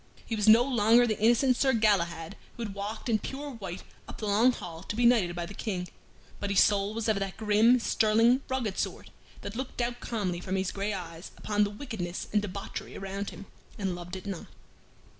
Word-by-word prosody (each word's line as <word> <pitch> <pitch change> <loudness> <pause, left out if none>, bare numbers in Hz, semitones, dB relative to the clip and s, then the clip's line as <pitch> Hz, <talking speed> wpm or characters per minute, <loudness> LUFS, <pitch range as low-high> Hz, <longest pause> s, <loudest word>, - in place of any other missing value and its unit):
He 225 - -2
was 210 0 0
no 225 +3 +8
longer 240 -2 +4
the 215 -3 -1
innocent 240 +3 +4
Sir 265 -1 +3
Galahad 185 -6 +1 0.2
who 235 - -4
had 205 -3 -5
walked 205 +4 -5
in 225 -3 +2
pure 285 +6 -6
white 195 -7 -7 0.2
up - - -9
the 215 - -5
Long 215 +5 +4
Hall 170 -8 -8
to 195 - -5
be 240 +1 +2
knighted 210 -8 +4
by 175 -1 -3
the 200 - -9
King, 185 -3 -3 0.5
but 200 - -3
his 200 - +3
soul 205 +1 +3
was 230 -1 -2
of 215 -2 +2
that 195 -1 -4
grim, 220 +3 +4
sterling, 230 +3 +3
rugged 245 -7 -2
sort - - -4 0.3
that 200 - -7
looked 260 +1 -5
out 240 0 -1
calmly 190 -7 -2
from 185 +1 -3
his 190 -1 -1
gray 200 +1 -2
eyes 170 -2 -6
upon 210 0 +1
the 205 - 0
wickedness 205 -6 -5
and 210 - +4
debauchery 200 -1 -6
around 195 +1 -4
him, 200 - -10 0.3
and 195 -3 -1
loved 175 +1 -7
it 190 - -8
not. 195 -4 -5
210 Hz, 210 wpm, -29 LUFS, 190-230 Hz, 0.5 s, no